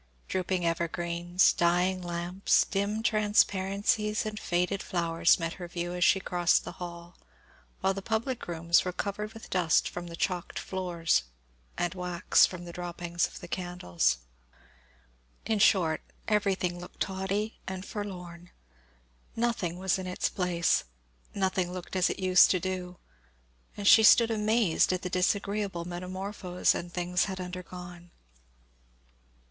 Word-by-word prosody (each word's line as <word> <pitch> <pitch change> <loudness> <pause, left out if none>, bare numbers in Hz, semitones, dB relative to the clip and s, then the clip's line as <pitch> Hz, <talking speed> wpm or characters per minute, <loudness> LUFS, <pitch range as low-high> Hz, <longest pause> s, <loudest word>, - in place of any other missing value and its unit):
Drooping 185 -1 -1
evergreens, 170 +1 +1
dying 180 +2 +2
lamps, 175 +2 +1
dim 205 +2 -2
transparencies, 210 0 +1
and 215 0 -4
faded 180 +1 0
flowers, 170 -2 +2
met 165 0 -2
her 175 - -5
view 175 0 -4
as 180 0 0
she 190 - +5
crossed 175 -2 +2
the - - -5
hall; 170 0 -8 0.6
while 190 +1 +2
the 195 - -5
public 230 +4 -2
rooms 170 0 +2
were 180 - -2
covered 210 +3 -4
with 225 - -12
dust 175 -4 +2
from 175 0 -6
the 170 - -7
chalked 180 0 -2
floors, 170 - 0 0.5
and 175 0 -1
wax 180 -2 +3
from 175 -1 -8
the 170 - -7
droppings 175 -1 -2
of - - -12
the 175 - -8
candles. 90 - -1 1.3
Everything, 225 - 0
in 215 - 0
short, 175 -6 +3 0.8
looked 180 - -12
tawdry 195 +3 -2
and 190 0 -5
forlorn. 180 -5 -7 0.9
Nothing 225 -7 -1
was 190 0 0
in 185 - -5
its 180 - -1
place 175 -3 +1 0.5
nothing 185 -2 0
looked 185 +1 -7
as 185 -1 +3
it - - -3
used 185 -1 +6
to 185 - +2
do 180 -1 -4 0.8
and 205 - -5
she 220 - +9
stood 230 +1 +6
amazed 215 -5 +2
at 185 0 -2
the 180 - -4
disagreeable 200 -1 0
metamorphose 180 +1 -1
an 175 - -5
things 180 +1 0
had 190 -2 -5
undergone. 180 -1 -8
180 Hz, 140 wpm, -29 LUFS, 175-195 Hz, 1.3 s, she